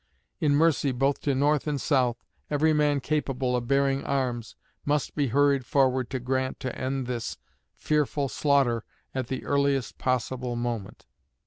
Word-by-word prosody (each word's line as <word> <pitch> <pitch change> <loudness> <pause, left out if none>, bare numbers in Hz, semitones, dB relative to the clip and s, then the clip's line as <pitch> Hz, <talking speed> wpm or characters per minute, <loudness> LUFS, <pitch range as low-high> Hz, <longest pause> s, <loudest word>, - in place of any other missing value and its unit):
In 150 -4 +3
mercy, 150 -3 +3
both 135 +3 0
to 140 -2 0
North 145 +2 +2
and 145 -2 -1
South, 125 -4 +1 0.3
every 155 +2 +3
man 150 -2 +2
capable 135 -4 -1
of 120 -1 -2
bearing 140 0 +2
arms 125 -4 -2 0.3
must 145 -1 0
be 145 -2 0
hurried 140 +2 +3
forward 130 -1 +2
to 130 - -3
Grant 130 +1 -2
to 130 - -3
end 130 0 -2
this, 120 -2 -4 0.4
fearful 150 -2 0
slaughter 135 -5 +2 0.3
at 130 -2 -2
the 130 0 -4
earliest 140 -2 0
possible 125 0 -1
moment. 120 -4 -4
135 Hz, 150 wpm, -27 LUFS, 125-145 Hz, 0.4 s, In